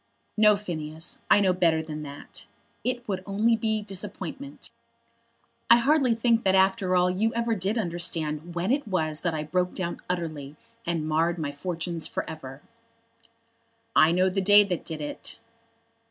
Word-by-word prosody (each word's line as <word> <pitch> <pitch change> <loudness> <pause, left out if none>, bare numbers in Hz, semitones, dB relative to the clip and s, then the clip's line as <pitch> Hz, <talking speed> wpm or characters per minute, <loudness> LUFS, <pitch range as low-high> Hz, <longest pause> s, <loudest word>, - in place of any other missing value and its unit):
"No, 210 -1 +6
Phineas. 160 -5 -5
I - - +6
know 190 -2 +3
better 165 -3 +2
than 155 -1 -6
that. 145 -1 -10 0.4
It 250 -1 -2
would 190 -3 -2
only 215 +4 +2
be 220 -1 -1
disappointment. 210 +8 -5 1.0
I 235 - +9
hardly 265 -1 +3
think 230 0 +2
that 190 0 +3
after 190 -1 +3
all 180 0 +3
you 215 +5 0
ever 235 0 0
did 200 +2 -1
understand 170 -4 -2
when 180 +6 0
it 285 -2 0
was 160 -5 -1
that 170 -2 -1
I 150 - -2
broke 180 +4 -1
down 175 -2 -4
utterly 155 -5 -4 0.3
and 165 -2 -1
marred 165 +3 +1
my 155 -3 -3
fortunes 170 +2 -3
for - - -4
ever." 140 -4 -9 1.3
"I 160 - +6
know 180 +2 +3
the 190 +1 0
day 205 +2 +7
that 185 -4 -3
did 160 -2 -5
it." 145 - -6
180 Hz, 160 wpm, -26 LUFS, 160-210 Hz, 1.3 s, I